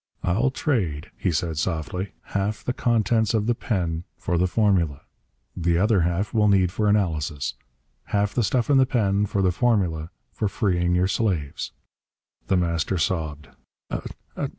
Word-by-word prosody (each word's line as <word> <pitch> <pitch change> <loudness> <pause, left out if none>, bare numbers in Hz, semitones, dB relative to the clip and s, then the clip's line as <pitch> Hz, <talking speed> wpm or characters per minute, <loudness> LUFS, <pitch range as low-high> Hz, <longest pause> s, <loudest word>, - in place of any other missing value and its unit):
"I'll 110 +10 +2
trade," 100 - -1
he - - 0
said 80 -1 -1
softly. 90 +3 -2 0.2
"Half 100 +2 -1
the 125 - -1
contents 115 -2 +2
of 105 -1 +1
the 120 - +2
pen 85 -8 -2
for 85 - -2
the 90 - +3
formula. 90 -8 +1 0.5
The 85 -1 +1
other 105 +1 +3
half 90 +6 0
we'll 105 -2 +4
need 95 -3 +4
for 105 +3 0
analysis. 75 -9 0 0.5
Half 100 0 0
the 120 - +1
stuff 120 +4 +1
in 140 - +6
the 130 - +4
pen 105 -5 +1
for 100 0 0
the 90 - +3
formula 90 -8 +1 0.2
for 105 - -1
freeing 90 -4 +1
your 90 +1 +3
slaves!" 90 -8 -1 0.8
The 95 - +3
Master 85 +1 0
sobbed. 75 -4 -2
95 Hz, 150 wpm, -24 LUFS, 85-105 Hz, 0.8 s, in